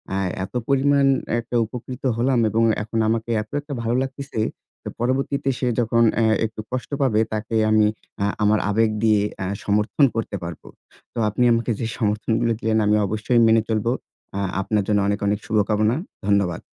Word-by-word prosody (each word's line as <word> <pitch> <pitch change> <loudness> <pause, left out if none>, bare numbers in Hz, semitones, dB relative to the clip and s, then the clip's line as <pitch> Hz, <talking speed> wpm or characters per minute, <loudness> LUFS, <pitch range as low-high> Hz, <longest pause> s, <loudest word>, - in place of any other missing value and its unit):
আ - - 0 0.3
এত - - -8
পরিমাণ 140 0 +3 0.3
একটা 120 +1 -6
উপকৃত 125 +2 -8
হলাম 125 +1 +2
এবং 115 +2 +1 0.2
এখন 115 +1 -3
আমাকে 115 +1 -1
এত 105 - -11
একটা 145 0 -7
ভালো 115 +1 0
লাগতেছে 135 -3 -5 0.4
তো - - -5
পরবর্তীতে 135 +3 0
সে 125 - 0
যখন, 115 0 +2 0.2
আ - - +3 0.2
একটু 110 0 -6
কষ্ট 130 0 -3
পাবে, 115 -6 +2
তাকে 110 +1 -3
আমি 110 -1 +4 0.4
আ - - +2 0.2
আমার 105 +1 +3
আবেগ 110 +2 +2
দিয়ে 110 -2 +4 0.2
আ - - -2 0.2
সমর্থন 105 +7 +2
করতে 115 -3 -3
পারবো। 85 -2 -8 0.5
তো - - -11
আপনি 125 +4 0
আমাকে 115 +1 0
যে 115 - -2
সমর্থনগুলো 110 +1 0
দিলেন 110 0 +1
আমি 105 +1 +3
অবশ্যই 110 +4 +1
মেনে 110 0 +5
চলবো। 110 +2 0 0.5
আ - - -1 0.2
আপনার 105 0 0
জন্য 105 -1 +2
অনেক 100 +1 0
অনেক 105 0 +1
শুভকামনা। 110 +1 +1 0.3
ধন্যবাদ। 100 -4 +1
110 Hz, 170 wpm, -22 LUFS, 105-125 Hz, 0.5 s, মেনে